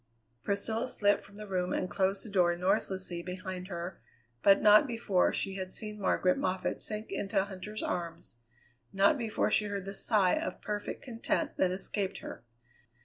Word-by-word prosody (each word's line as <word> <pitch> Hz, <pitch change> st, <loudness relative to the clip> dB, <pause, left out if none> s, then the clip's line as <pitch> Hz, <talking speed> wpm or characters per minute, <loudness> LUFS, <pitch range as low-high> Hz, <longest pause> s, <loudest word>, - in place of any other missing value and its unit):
Priscilla 220 Hz, +4 st, 0 dB
slipped 205 Hz, -4 st, +2 dB
from 200 Hz, -, -14 dB
the 210 Hz, +1 st, -7 dB
room 180 Hz, -2 st, -1 dB
and 185 Hz, -, 0 dB
closed 195 Hz, +2 st, 0 dB
the -, -, -8 dB
door 175 Hz, -3 st, +3 dB
noiselessly 185 Hz, -1 st, -1 dB
behind 185 Hz, 0 st, -6 dB
her, 175 Hz, -1 st, -6 dB, 0.4 s
but 195 Hz, 0 st, +6 dB
not 210 Hz, +6 st, +7 dB
before 225 Hz, -6 st, +2 dB
she 195 Hz, 0 st, -2 dB
had 185 Hz, -1 st, -4 dB
seen 210 Hz, 0 st, -5 dB
Margaret 185 Hz, -1 st, +2 dB
Moffatt 185 Hz, 0 st, -1 dB
sink 215 Hz, 0 st, -5 dB
into 195 Hz, 0 st, 0 dB
Huntter's 200 Hz, +2 st, -6 dB
arms; 170 Hz, -7 st, -4 dB, 0.5 s
not 195 Hz, +9 st, +4 dB
before 230 Hz, -5 st, 0 dB
she 210 Hz, -, +3 dB
heard 200 Hz, -2 st, -4 dB
the 195 Hz, -, -5 dB
sigh 200 Hz, -2 st, +2 dB
of 185 Hz, -, -2 dB
perfect 205 Hz, -1 st, -4 dB
content 235 Hz, -3 st, -2 dB
that 185 Hz, -, +3 dB
escaped 195 Hz, +1 st, -1 dB
her. -, -, -8 dB
195 Hz, 165 wpm, -31 LUFS, 185-210 Hz, 0.5 s, not